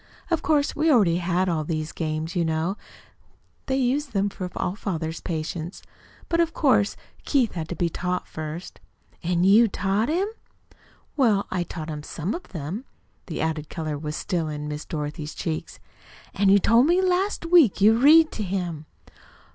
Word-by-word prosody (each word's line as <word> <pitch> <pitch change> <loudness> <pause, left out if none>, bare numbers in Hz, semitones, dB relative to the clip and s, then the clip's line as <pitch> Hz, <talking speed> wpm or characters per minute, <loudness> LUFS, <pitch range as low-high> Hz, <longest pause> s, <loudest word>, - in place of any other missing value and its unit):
Of 335 - +2
course, 295 -2 +1
we 315 +2 +2
already 195 - +4
had 180 +1 0
all 165 -3 0
these 155 0 -3
games, 155 +1 -3
you 175 - +2
know. 160 +4 -1 0.9
They 265 - +1
use 270 +3 +1
them 205 -5 0
for 185 -2 -6
all 180 - -2
father's 165 -6 -4
patients. 165 +1 -4 0.4
But, 335 - 0
of 335 -1 +1
course, 220 -9 +3 0.3
Keith 260 -6 +2
had 160 -2 -5
to 175 - -3
be 175 - +1
taught 180 +2 -3
first." 155 +3 -7 0.4
"And 175 +1 +1
you 215 +4 +6
taught 200 +4 0
him?" 360 +6 +1 0.9
"Well, 220 -8 +3
I 185 - 0
taught 160 -2 -6
him 150 -1 -5
some 165 +5 -4
of 355 - -7
them." 175 - -5 0.4
The 165 - -4
added 155 -1 -2
color 155 -2 -3
was 150 +1 -5
still 170 -3 -2
in 150 -1 -5
Miss 150 +1 -5
Dorothy's 150 -1 -5
cheeks. 160 -1 -4 0.5
"An' 195 0 +2
you 200 - +7
told 230 +7 +4
me 350 +2 +4
last 375 0 +1
week 330 - +5
you 215 +3 +6
read 310 +6 +6
to - - -5
him." 175 -6 -3
180 Hz, 170 wpm, -25 LUFS, 160-240 Hz, 0.9 s, you